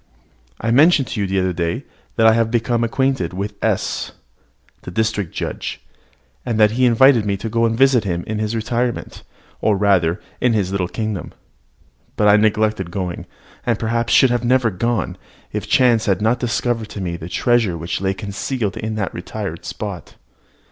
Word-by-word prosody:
I 115 - -1
mentioned 140 0 +5
to 105 - -3
you 100 - 0
the 95 0 0
other 95 -1 0
day 85 +9 -2 0.3
that 110 - +3
I 110 - +7
had 115 0 +2
become 120 0 0
acquainted 130 -6 0
with 100 +3 -4
S, - - -1 0.7
the - - -8
district 105 -2 -1
judge, - - -4 0.6
and 115 -3 -2
that 105 -1 +5
he 125 +3 +2
had - - +5
invited 120 0 +5
me 100 -1 -1
to 110 +3 -5
go 115 +1 +1
and 115 0 0
visit 135 -3 +4
him 85 -4 -2
in 110 0 -3
his 110 +1 -1
retirement, 120 +2 -2 0.4
or 105 -2 +2
rather 95 -3 +2 0.2
in 125 -2 +3
his 100 -4 0
little 95 -2 -1
kingdom. 110 -3 -4 0.8
But 105 - +3
I 105 - +7
neglected 105 -3 +1
going, 90 -1 -4 0.4
and 120 -3 0
perhaps 115 +1 -1
should 130 -3 +5
never 125 -2 +3
have 90 - -13
gone, 110 -6 -1 0.3
if - - -4
chance 120 -4 +3
had 95 -3 +2
not 110 +3 +1
discovered 120 -1 -1
to - - -7
me 85 -2 -3
the 85 0 -8
treasure 115 -5 +1
which 85 +3 -4
lay 95 0 0
concealed 105 +2 -3
in 110 0 -3
that 100 -3 -2
retired 95 -1 -6
spot. 95 0 -6
110 Hz, 185 wpm, -20 LUFS, 95-120 Hz, 0.8 s, I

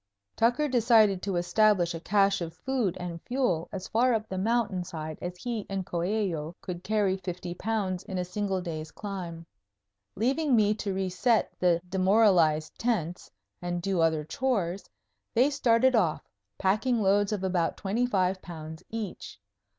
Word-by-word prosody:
Tucker 245 +6 +2
decided 225 -6 +4
to 195 -2 -2
establish 175 0 +3
a 165 - -5
cache 195 +2 +2
of 165 -1 -5
food 240 -4 -1
and 170 -2 -5
fuel 245 -11 -1
as 190 -2 -5
far 240 +2 +3
up 220 0 -2
the 190 - -5
mountain 210 -3 0
side 160 -3 -6
as 175 0 -5
he 230 +2 -3
and 195 -1 -3
Coello 175 -3 -2
could 180 -1 -6
carry 205 -3 +1
fifty 180 -1 -5
pounds 190 -2 -2
in 190 - -5
a 180 - -1
single 195 0 -2
day's 160 -3 -5
climb. 175 -4 -6 0.7
Leaving 270 +5 +2
me 210 -2 +4
to 210 -1 -3
reset 195 +5 +1
the 175 -2 +3
demoralized 185 -5 +3
tents 180 -8 -1 0.3
and 175 0 -2
do 185 -1 0
other 160 -2 +2
chores, 195 - -2 0.5
they 255 +5 +4
started 260 -2 +3
off, 180 -10 +1 0.3
packing 215 +4 +1
loads 200 +1 +3
of 205 -3 -2
about 180 -3 0
twenty 220 +5 0
five 190 -4 +1
pounds 160 -2 -9
each. 210 - -6
190 Hz, 155 wpm, -28 LUFS, 175-220 Hz, 0.7 s, decided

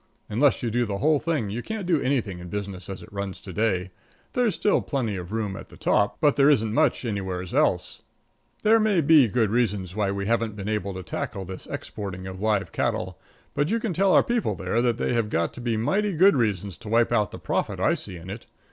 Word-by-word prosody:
Unless 130 +6 +2
you 115 - 0
do 120 +1 +1
the 100 -1 -2
whole 150 +5 +3
thing 150 -10 -1
you 115 +4 -3
can't 220 - -5
do 170 -5 +2
anything 120 -9 -1
in 90 0 -9
business 100 -2 -5
as 95 - -6
it 110 - -15
runs 100 -1 -4
to 95 - -9
day. 95 -2 0 0.4
There's 245 -5 +1
still 205 - +2
plenty 120 -8 -2
of 90 0 -6
room 105 -3 -2
at - - -9
the - - -14
top, 100 - +1
but 150 -3 +3
there 140 +1 +6
isn't 110 -7 +2
much 145 -2 +2
anywheres 95 -4 -3
else. - - +1 0.6
There 225 +1 +5
may 210 -5 +3
be 150 -4 +6
reasons 105 -5 0
why 105 -2 +1
we 100 0 -2
haven't 115 -1 0
been 100 -1 -6
able 100 -3 -2
to 95 - -6
tackle 95 +2 -4
this 95 0 -8
exporting 95 -3 -6
of 95 0 -7
live 105 -2 +1
cattle, - - -2 0.3
but 145 +2 0
you 230 - +1
can 220 -5 -2
tell 195 +3 +3
our - - +6
people 240 -1 0
there 115 - 0
that 120 -2 +1
they - - 0
have 115 -3 0
got 85 -4 0
to 125 - -9
be 120 -2 0
mighty 195 - +1
good 185 +3 +5
reasons 100 - -1
to 105 - -9
wipe 115 +2 +3
out 105 -3 +2
the - - -8
profit - - -2
I - - +3
see - - -6
in 85 +3 -8
it. 110 +4 -8
110 Hz, 230 wpm, -25 LUFS, 100-140 Hz, 0.6 s, there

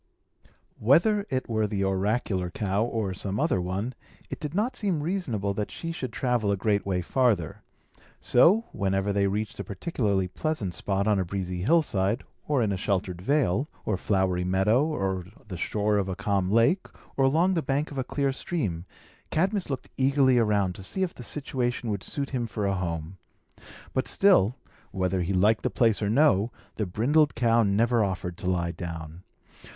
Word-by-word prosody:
Whether 175 - +3
it 130 -2 -2
were 110 -2 0
the 100 -1 -1
oracular 95 -1 0
cow 100 +3 -1
or 110 -5 -2
some 95 +2 -3
other 150 - +1
one, 95 +8 -3 0.4
it - - -5
did 150 +1 -5
not 220 +6 0
seem 185 -8 -1
reasonable 125 - -1
that 105 +1 -3
she 165 - -5
should 130 -7 -5
travel 120 -4 0
a 100 - 0
great 100 0 0
way 90 -2 0
farther. 110 - +1 0.6
So, 195 - +4
whenever 95 -1 0
they 100 0 +2
reached 105 +2 -3
a - - -2
particularly 100 - -1
pleasant 100 - -2
spot 100 +2 -1
on 105 -2 +2
a - - +1
breezy 90 -1 -4
hillside, 115 - +2 0.2
or 140 -5 +2
in 105 - 0
a 95 - -1
sheltered 90 -2 -2
vale, 135 - +1 0.2
or 105 - +1
flowery 95 -2 0
meadow, 105 - +2
on 95 -1 -2
the 95 - -6
shore 105 +4 0
of 100 -1 -1
a 95 - -2
calm 100 -2 0
lake, 115 - +3 0.3
or 135 - +2
along 165 +8 +3
the 165 - +1
bank 145 +1 -1
of 140 - -4
a - - 0
clear 135 +1 -1
stream, 105 - -3 0.4
Cadmus 190 +3 0
looked 135 -2 -4
eagerly 130 -2 +4
around 105 -4 +2
to 95 - -10
see 190 - -1
if 180 - -2
the - - -11
situation 125 -3 -2
would 100 -2 -2
suit 140 +5 -4
him 120 -3 -1
for 105 -2 -3
a 100 - +1
home. 85 -1 -4 0.7
But 130 - 0
still, 155 - +4 0.3
whether 95 -2 -1
he 90 +2 -1
liked 100 +3 +3
the - - 0
place 115 -3 +2
or 100 - 0
no, 115 -4 +3 0.3
the 105 - -1
brindled 145 - +2
cow 115 0 +3
never 115 +3 +2
offered 90 -2 -3
to 90 - -2
lie 85 -2 0
down. 85 -2 -7
105 Hz, 180 wpm, -27 LUFS, 95-135 Hz, 0.7 s, So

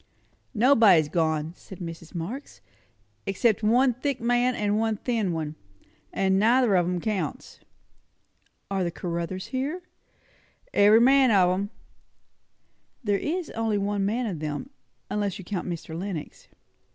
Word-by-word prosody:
"Nobody's 215 - +5
gone," 160 -1 0
said 190 - -12
Mrs. 165 -1 -8
Marx; 215 - -6 0.7
"except 205 +3 +2
one 245 +4 +3
thick 265 +2 -2
man 245 +1 +2
and 210 0 0
one 220 -1 0
thin 225 -5 -1
one; 155 -2 -3 0.6
and 190 0 +1
neither 235 +1 +4
of 175 -2 +3
'em 180 0 -1
counts." 190 -6 -4 1.1
"Are 195 -1 0
the 175 - 0
Caruthers 170 +2 -4
here?" 285 +7 -3 0.9
"Every 210 +3 +6
man 265 +1 +5
of 185 -4 +4
'em." 195 +2 -1 1.3
"There 205 -3 +1
is 340 +1 -3
only 225 -2 -1
one 200 0 -1
man 230 +5 0
of 185 -8 -4
them; 155 - -5 0.4
unless 205 -3 -1
you 190 - -10
count 185 -1 -4
Mr. 165 -2 -6
Lenox." 175 -3 -6
200 Hz, 135 wpm, -26 LUFS, 175-235 Hz, 1.3 s, Every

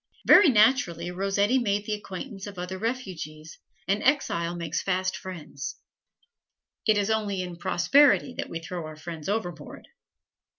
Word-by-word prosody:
Very 395 - +8
naturally, 210 - +3
Rossetti 200 +6 +1
made 205 -3 0
the 215 - -2
acquaintance 205 0 -7
of 200 -2 -9
other 180 +1 -5
refugees, 180 - -5 0.3
and 200 +2 +1
exile 175 - +1
makes 170 -2 -3
fast 185 -1 -1
friends. 160 -6 -7 1.1
It 215 -1 +5
is 205 +1 +1
only 205 -4 -1
in 180 -1 -7
prosperity 270 +9 +4
that - - -3
we 165 - -4
throw 165 -1 -6
our 155 - -9
friends 160 +1 -7
overboard. 175 -8 -4
190 Hz, 140 wpm, -26 LUFS, 170-215 Hz, 1.1 s, Very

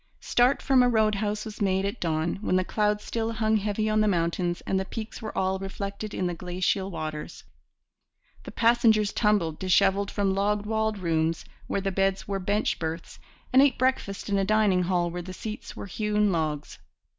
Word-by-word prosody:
Start 245 +3 +2
from 265 -2 +4
a 250 - +4
road 220 -2 +3
house 210 +1 -2
was 215 -1 -8
made 190 -1 +1
at 200 +4 -3
dawn, 165 +2 -1
when 185 - 0
the 185 - +3
clouds 210 0 0
still 230 0 -2
hung 220 0 +2
heavy 210 +1 -1
on 215 0 +2
the 215 - +3
mountains 175 -1 0
and 190 - -1
the 190 - -2
peaks 220 +2 -7
were 220 - -6
all 190 0 0
reflected 200 +2 -5
in 185 - -2
the 175 - -1
glacial 180 +2 -1
waters. 155 -4 -6 1.0
The - - -9
passengers 225 -3 +3
tumbled 200 -8 +1
dishevelled 195 +2 +2
from 200 -2 0
log 205 +1 0
walled 220 0 0
rooms 165 -2 0 0.2
where 200 - -1
the 195 0 -1
beds 195 0 0
were 200 -1 -2
bench 205 +3 0
berths, 160 0 -5 0.3
and 260 - +7
ate 280 -3 +4
breakfast 255 -6 -1
in 200 -1 +1
a - - +2
dining 205 -2 +3
hall 175 -1 0
where 175 +1 -4
the 185 +1 -8
seats 215 +4 -7
were - - -7
hewn 210 +1 0
logs. 155 -4 -2
200 Hz, 190 wpm, -26 LUFS, 185-215 Hz, 1.0 s, and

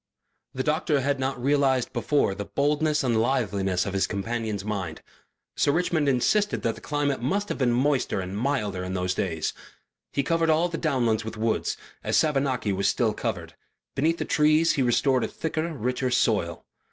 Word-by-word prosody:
The 130 - -1
doctor 150 -1 +1
had 140 +1 0
not 130 -1 -2
realized 135 -1 +1
before 125 -3 +1
the 100 +1 -5
boldness 150 +3 +1
and 115 -4 +2
liveliness 100 -7 0
of 100 - -4
his 95 - +1
companion's 105 0 -3
mind. 95 -6 -4 0.5
Sir - - +2
Richmond 160 -2 +1
insisted 205 - +1
that 115 - +1
the - - -13
climate 145 -3 -1
must 200 +11 -1
have - - -3
been 125 -3 +2
moister 130 -2 +1
and 95 +1 -5
milder 105 -6 -1
in 90 +1 -4
those 90 0 0
days; 85 -4 -2 0.6
he 140 - 0
covered 165 +2 +1
all 160 +3 +3
the 165 - -4
downlands 120 -8 +1
with 110 0 -7
woods, 110 0 -1 0.3
as - - +1
Savernake 135 -9 +1
was 100 - +1
still 115 -3 +1
covered; 90 -8 -4 0.4
beneath 160 +5 +1
the - - -3
trees 155 +2 +3
he 140 - 0
restored 130 +1 +2
a - - 0
thicker, 160 +1 -3
richer 125 -1 -1
soil. 100 -8 0
130 Hz, 175 wpm, -26 LUFS, 105-145 Hz, 0.6 s, all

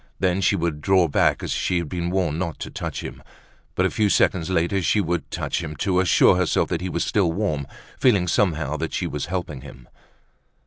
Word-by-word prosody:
Then 95 0 +1
she 95 - +3
would 80 -3 -2
draw 95 0 +3
back 70 - +1
as - - -3
she 90 - 0
had 85 -2 -2
been 85 +2 -3
warned 90 -4 0
not 85 -5 -3
to - - -5
touch - - -5
him. - - -8 0.5
But - - +2
a - - +1
few 105 -2 +1
seconds 90 -3 +2
later 95 +2 +1
she 105 - +2
would 85 -3 -2
touch - - -2
him 75 - -6
to 90 +5 0
assure 90 0 +4
herself 90 -2 +1
that - - -2
he 95 - -3
was 85 - -1
still 95 -5 +1
warm, 80 -7 -2 0.3
feeling 100 -9 +3
somehow 80 -6 0
that 80 +1 -4
she - - -1
was 75 -1 -4
helping 85 -7 -4
him. 65 -1 -13
85 Hz, 215 wpm, -23 LUFS, 80-95 Hz, 0.5 s, assure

